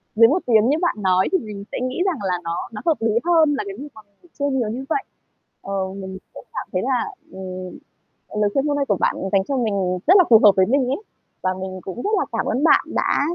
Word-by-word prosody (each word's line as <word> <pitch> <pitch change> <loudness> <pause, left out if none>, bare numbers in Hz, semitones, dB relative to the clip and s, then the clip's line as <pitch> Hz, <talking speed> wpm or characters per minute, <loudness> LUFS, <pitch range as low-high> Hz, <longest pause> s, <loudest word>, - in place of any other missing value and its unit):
dưới 230 +1 +7
1 325 +8 +2
tiếng 225 0 +4
như 300 - +2
bạn 345 - +1
nói 185 -1 +2
thì 375 - +4
mình 205 -2 -8
sẽ - - -3
nghĩ 255 +5 -3
rằng 355 -7 0
là 180 -2 0
nó 170 0 -3 0.2
nó 210 - -6
hợp 325 -2 +2
lý 225 - +2
hơn 320 -4 +4
là - - -2
cái 195 - -6
việc 290 +2 -7
mà 220 - -12 0.2
mình 350 - -23
chơi 285 0 +1
nhiều 245 -5 0
như 255 +4 -5
vậy. 395 +5 0 0.6
Ờ, 195 - -6 0.2
mình 190 -1 -7 0.2
cũng - - -11
cảm - - -5
thấy 185 - 0
là, 270 - -1 0.2
ừm, 185 -1 -7 0.6
lời 205 - +3
khuyên 275 - +1
hôm 290 - +1
nay 280 - 0
của 200 - +1
bạn - - +1 0.2
dành 195 -1 +3
cho 275 - -1
mình 225 -5 0 0.3
rất 370 +5 +8
là 370 - +7
phù 225 -2 +8
hợp 205 - +9
với 190 - +4
mình 260 +4 +1
ấy, 280 +12 -2 0.4
và 185 0 0
mình 185 -1 -6
cũng 195 +7 -6
rất - - 0
là - - 0
cảm - - -1
ơn 270 - -1
bạn - - +5
đã - - +1
230 Hz, 260 wpm, -21 LUFS, 195-285 Hz, 0.6 s, hợp